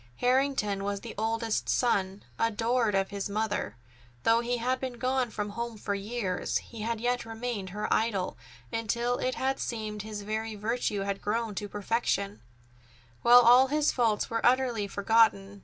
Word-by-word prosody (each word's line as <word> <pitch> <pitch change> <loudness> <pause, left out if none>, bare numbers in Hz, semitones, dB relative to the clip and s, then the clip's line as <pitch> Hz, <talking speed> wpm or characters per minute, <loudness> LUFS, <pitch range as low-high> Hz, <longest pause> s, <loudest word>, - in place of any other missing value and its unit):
Harrington 250 - +1
was 200 0 -2
the - - -7
oldest 225 +1 -1
son, 195 -5 +1 0.2
adored 230 0 +1
of 195 0 0
his 200 0 -3
mother. 205 - -2 0.5
Though 225 0 +4
he 240 +1 -1
had 255 +2 0
been 260 -2 -4
gone 255 0 0
from 210 -1 -4
home 235 +1 -4
for 205 0 -3
years, 200 -2 -2
he 230 -2 -8
had 230 +1 -2
yet 245 +1 0
remained 225 -3 -4
her 210 +3 -3
idol 210 -5 0 0.4
until 235 +2 0
it 255 0 -1
had 265 +1 -1
seemed 215 -3 -4
his 210 -1 -6
every 220 +1 -3
virtue 210 -1 -1
had 195 0 -3
grown 225 +1 -1
to 205 +2 -5
perfection, 205 -1 -1 0.8
while 245 +1 +8
all 245 +3 +7
his 300 +2 +2
faults 225 -4 +1
were 230 0 -2
utterly 245 -4 +2
forgotten. 200 -1 +2
225 Hz, 160 wpm, -29 LUFS, 205-240 Hz, 0.8 s, while